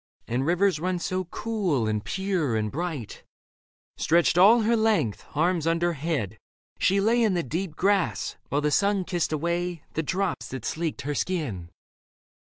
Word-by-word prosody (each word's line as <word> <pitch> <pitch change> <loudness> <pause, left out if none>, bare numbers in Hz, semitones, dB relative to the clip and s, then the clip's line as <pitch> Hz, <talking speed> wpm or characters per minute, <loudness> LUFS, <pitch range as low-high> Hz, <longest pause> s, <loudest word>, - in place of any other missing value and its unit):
And 125 +4 -1
rivers 180 -1 +2
run 180 +2 -1
so 185 +1 -2
cool 175 - -1
and 105 -1 -1
pure 180 - -1
and 105 -1 -1
bright... 155 - -5 0.7
Stretched 170 +1 +3
all 210 +7 +7
her 230 +2 +2
length, 220 - +1
arms 165 +1 +1
under 170 +1 +1
head, 135 - -3 0.4
she 195 +2 +3
lay 230 +4 +3
In 215 -5 +3
the 170 - 0
deep 165 +4 -3
grass, 195 0 +1
while 145 - +1
the 150 0 +1
sun 200 +3 +2
kissed 175 -3 -1
away 170 +1 -2
The 160 - 0
drops 185 +3 -2
that 130 -4 -6
sleeked 160 -1 -2
her 145 +2 -3
skin. 140 - -2
170 Hz, 160 wpm, -26 LUFS, 145-190 Hz, 0.7 s, all